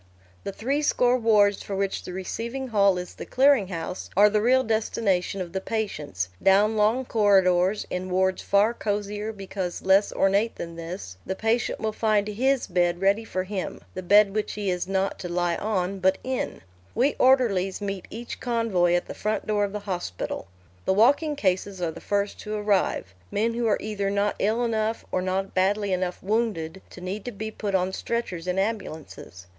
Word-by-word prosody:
The - - -4
three 270 +9 -1
score 250 -4 +3
wards 210 -4 +3
for 200 - -5
which 195 0 -1
the - - -6
receiving 235 +8 -4
hall 200 -4 +4
is 180 0 -6
the - - -8
clearing 265 -6 +4
house 175 0 -5
are 205 +1 +7
the 210 0 +2
real 260 +3 +4
destination 205 -4 0
of 175 -1 -6
the 190 - -2
patients; 150 - -3
down 205 +3 +4
long 220 +5 +2
corridors, 195 -3 +3
in 185 +1 -3
wards 190 +1 +1
far 205 +3 +3
cosier 210 0 -3
because 195 -3 -5
less 195 +2 +4
ornate 200 +4 +2
than 170 0 -7
this, 165 - -7
the 190 - -3
patient 225 +3 0
will 220 -1 -2
find 215 -2 +1
"his" 260 +5 +1
bed 175 -1 +1
ready 200 +4 +2
for 185 -4 -3
him, 190 -1 -4
the 185 - -5
bed 200 +2 +5
which 215 0 -2
he 205 -2 -1
is 180 0 -2
not 195 0 -1
to 180 - -5
lie 175 0 0
on 195 -2 -1
but 190 +1 +3
in. 260 0 -3 0.3
We 265 +5 +3
orderlies 225 -8 +3
meet 195 -3 -4
each 235 +2 -7
convoy 225 -8 +1
at 175 - 0
the - - -7
front 215 +1 -2
door 210 -1 +1
of 200 - -6
the 210 0 -5
hospital. 180 - -4 0.4
The - - +3
walking 285 +9 +3
cases 190 -4 -1
are 170 -2 -1
the - - -11
first 200 0 -1
to 215 0 -5
arrive 205 - 0 0.2
men 225 +3 0
who 235 0 0
are 210 - +3
either 205 -2 -2
not 200 +1 0
ill 220 +4 +1
enough, 220 -1 -1
or 185 - 0
not 190 +1 -2
badly 200 +1 +1
enough 180 -1 -2
wounded, 195 -5 -1
to 180 - -12
need 190 +3 -4
to 245 - -4
be 220 0 -5
put 205 -2 -3
on 185 0 +1
stretchers 190 -8 -3
in 180 +1 -1
ambulances. 175 - -4
200 Hz, 190 wpm, -25 LUFS, 185-220 Hz, 0.4 s, are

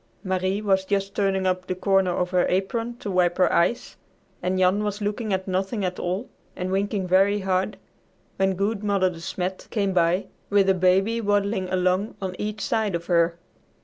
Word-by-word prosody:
Marie 190 +2 -1
was 190 -2 +2
just 195 0 -1
turning 195 -2 0
up 185 0 0
the 185 - -2
corner 195 0 +2
of 180 0 -1
her 180 -1 +2
apron 230 +6 -1
to 205 - -5
wipe 180 -1 +2
her 185 -2 +3
eyes, 200 +8 +1 0.4
and 185 +1 0
Jan 185 +3 +3
was 205 0 -2
looking 210 +1 -2
at 190 0 -1
nothing 190 +3 -1
at 180 0 -3
all 185 +7 -2 0.3
and 185 +1 -3
winking 195 0 -1
very 195 +3 +3
hard, 190 +1 0 0.6
when 190 0 +2
good 200 +2 -1
Mother 195 -3 +2
De 170 - -10
Smet, 185 +2 -4
came 200 -3 0
by 175 +1 +2 0.2
with 200 -1 +3
a - - +6
baby 190 +5 +2
waddling 200 -2 0
along 185 +3 0
on 185 -2 -4
each 215 +1 -3
side 220 -6 0
of 170 0 -4
her. 170 -1 +2
190 Hz, 185 wpm, -24 LUFS, 185-205 Hz, 0.6 s, a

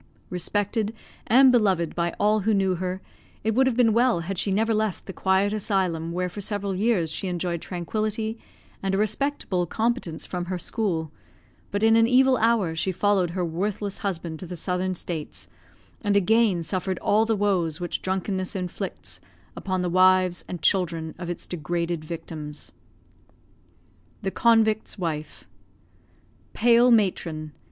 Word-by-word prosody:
Respected 205 +4 -1 0.3
and 260 +3 +7
beloved 190 -9 +2
by 170 0 -1
all 215 +1 +3
who 215 +2 +1
knew 190 -1 +2
her, 185 +1 -4 0.4
it 220 +1 +1
would 260 +3 +4
have 250 -2 0
been 230 -3 +4
well 235 -6 +3
had 185 +2 -3
she 200 - 0
never 220 +3 +2
left 215 -3 -1
the 190 - -7
quiet 190 +2 +1
asylum 185 -6 -1
where 180 +1 -1
for 190 +3 -7
several 200 -1 -2
years 190 -5 +1
she 190 - -2
enjoyed 175 -1 -2
tranquillity 215 +5 -3 0.4
and 195 0 0
a - - +1
respectable 215 -4 0
competence 225 -5 -1
from 180 -1 -4
her 185 +1 -3
school; 170 -5 -2 0.6
but 205 +1 -2
in 225 0 +6
an 225 0 +5
evil 260 +1 +5
hour 220 -7 +2
she 190 +4 0
followed 190 -1 +2
her 180 - +1
worthless 200 +4 -3
husband 170 -5 -4
to 185 - -8
the 180 - -6
Southern 180 +2 -2
States, 165 -3 -5 0.5
and 205 -2 +2
again 205 -3 +3
suffered 185 +2 -2
all 215 +2 +3
the 225 0 +1
woes 185 -6 0
which 175 -1 -3
drunkenness 190 0 -2
inflicts 180 -2 -5 0.4
upon 185 -1 -2
the - - 0
wives 185 0 +4
and 175 -4 -6
children 165 -4 +1
of 175 -1 -5
its 175 - -5
degraded 170 0 -3
victims. 155 -2 -7 1.5
THE 190 - -1
CONVICT'S 220 -2 +2
WIFE 155 -4 -4 1.1
Pale 240 +2 +5
matron! 170 -8 +1
190 Hz, 155 wpm, -25 LUFS, 175-215 Hz, 1.5 s, and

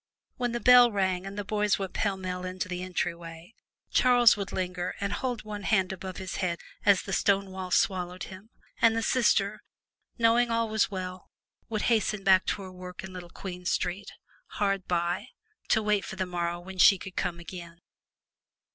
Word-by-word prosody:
When 245 -1 -1
the 240 - -2
bell 245 -1 +7
rang 190 -2 0
and 195 +1 -8
the 205 - -2
boys 210 0 +1
went 195 -2 -5
pellmell 185 -3 -2
into 185 0 -4
the 180 -1 -4
entry 180 -1 -2
way, 170 +3 -11 0.4
Charles 245 -2 +6
would 200 -2 -5
linger 180 -1 -3
and 200 0 -2
hold 245 -1 -3
one 210 -1 -6
hand 190 -2 +1
above 185 0 -7
his 190 -1 -5
head 175 -2 -1 0.3
as 200 -2 +4
the 195 - -5
stone 195 -1 +2
wall 185 -1 -6
swallowed 180 -1 0
him, 190 +3 -10 0.3
and 230 -1 +5
the 225 - 0
sister 215 -4 +2 0.6
knowing 235 +1 +4
that 230 - -1
all 230 -1 0
was 220 -1 +1
well 185 -2 -6 0.4
would 215 -2 -2
hasten 215 -3 +1
back 190 -1 +5
to 200 - -1
her 185 - -9
work 180 0 -9
in 190 0 -8
Little 180 -1 -8
Queen 180 0 -8
Street, 185 +2 -2 0.5
hard 195 -2 0
by, 175 +4 -1 0.4
to 220 - +3
wait 210 -1 +1
for - - -7
the 190 0 -1
morrow 175 -1 -2
when 185 +1 -10
she 195 - +8
could 185 0 -9
come 170 -1 -2
again. 170 -1 -9
190 Hz, 190 wpm, -28 LUFS, 180-210 Hz, 0.6 s, she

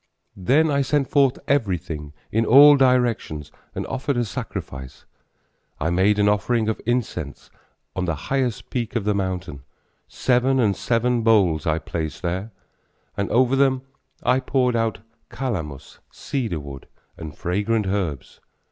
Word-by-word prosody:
Then 140 - +2
I 140 0 +2
sent 140 0 +1
forth 140 -3 +3
everything 90 - -1 0.2
in 110 +2 +2
all 145 +5 +8
directions, 120 - +1 0.2
and - - -3
offered 135 0 -2
a 120 - +1
sacrifice, 65 - -7 0.7
I 80 +2 0
made 95 +4 +3
an 105 0 +3
offering 105 +2 +1
of 110 - -3
incense 110 - -3 0.4
on 95 - -1
the 85 -3 -1
highest 125 - -2
peak 120 -3 -3
of 115 - 0
the 105 +1 +1
mountain, 95 -7 -3 0.5
Seven 130 +1 +1
and 105 -5 +2
seven 120 +3 +1
bowls 95 -9 +3
I 80 0 +2
placed 80 +1 -5
there, 95 +5 -3 0.6
And 100 - -2
over 130 +2 +3
them 135 -1 +2 0.4
I 125 +1 +3
poured 130 -2 +1
out 115 -3 -1 0.3
calamus, 90 - -5
cedar 115 - -3
wood 70 -2 -10 0.3
and 80 -3 -9
fragrant 105 +4 0
herbs. 95 -9 -3
110 Hz, 140 wpm, -23 LUFS, 90-125 Hz, 0.7 s, all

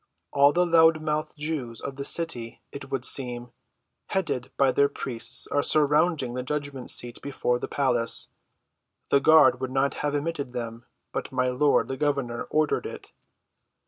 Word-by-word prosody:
"All 140 +1 +5
the 180 +3 +2
loud‐mouthed 160 -2 +2
Jews 145 -7 -4
of 140 - -6
the 140 - -5
city, 140 -8 -2
it 135 -1 -9
would 130 -2 -2
seem, 125 -2 +2 0.6
headed 145 -10 -2
by 135 -1 +4
their 140 +2 +3
priests, 120 -4 -2
are 145 - 0
surrounding 150 -3 +2
the 125 0 -4
judgment‐seat 135 -4 -1
before 125 -3 -1
the - - -5
palace. 125 -4 0 0.8
The 140 - +5
guard 155 -3 +5
would 130 - -2
not 135 +2 0
have 145 0 -1
admitted 145 -3 -3
them; 115 -1 -6 0.2
but - - -5
my 130 0 0
lord, 140 +3 +2
the 135 - -5
governor, 140 -5 -2
ordered 155 -1 0
it." - - -10
140 Hz, 150 wpm, -25 LUFS, 125-150 Hz, 0.8 s, All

